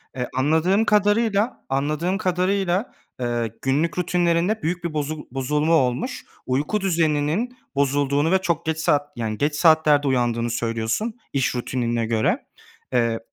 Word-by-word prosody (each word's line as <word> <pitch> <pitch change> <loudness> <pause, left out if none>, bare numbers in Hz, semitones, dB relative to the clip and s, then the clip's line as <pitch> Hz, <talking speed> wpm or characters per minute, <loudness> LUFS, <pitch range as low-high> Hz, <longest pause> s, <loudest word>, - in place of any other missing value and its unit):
Eee, 125 -1 -2
anladığım 160 +10 +2
kadarıyla 210 +2 +2
anladığım 150 +7 0
kadarıyla, 185 +2 0 0.3
ııı, 120 -2 -1
günlük 150 +5 0
rutinlerinde 180 +3 +1
büyük 175 +2 -2
bir 170 -2 -3
bozu 150 0 -3
bozulma 150 +5 0
olmuş. 135 - 0 0.2
Uyku 145 +11 0
düzeninin 170 +6 0 0.2
bozulduğunu 140 +2 +1
ve 190 - +5
çok 170 -2 -1
geç 160 0 -1
saat 145 -2 +1
yani, 110 -3 -3
geç 145 +5 0
saatlerde 155 -2 +4
uyandığını 120 -3 +1
söylüyorsun 115 - -2 0.2
iş 135 -2 0
rutinine 120 -1 -1
göre. 110 -1 0 0.5
Eee, 115 -2 +1
150 Hz, 130 wpm, -23 LUFS, 130-180 Hz, 0.5 s, ve